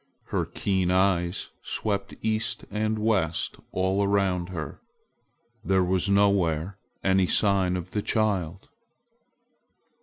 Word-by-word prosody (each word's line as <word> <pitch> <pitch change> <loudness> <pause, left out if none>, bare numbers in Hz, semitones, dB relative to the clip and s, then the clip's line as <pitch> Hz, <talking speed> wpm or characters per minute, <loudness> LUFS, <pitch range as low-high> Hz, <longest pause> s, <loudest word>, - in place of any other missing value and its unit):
Her - - -1
keen 95 -3 0
eyes 90 -1 +1
swept - - -3
east 110 0 -1
and 110 +1 0
west 100 -7 0
and - - -23
all 95 +2 +1
around 95 -3 +1
her. 80 -5 -6 0.8
There 95 +1 +2
was 90 +1 +1
nowhere 100 -3 +2 0.2
any 95 -1 +3
sign 95 -3 +2
of 90 0 -7
the 105 - -1
child. 95 -5 -1
95 Hz, 115 wpm, -26 LUFS, 90-100 Hz, 0.8 s, any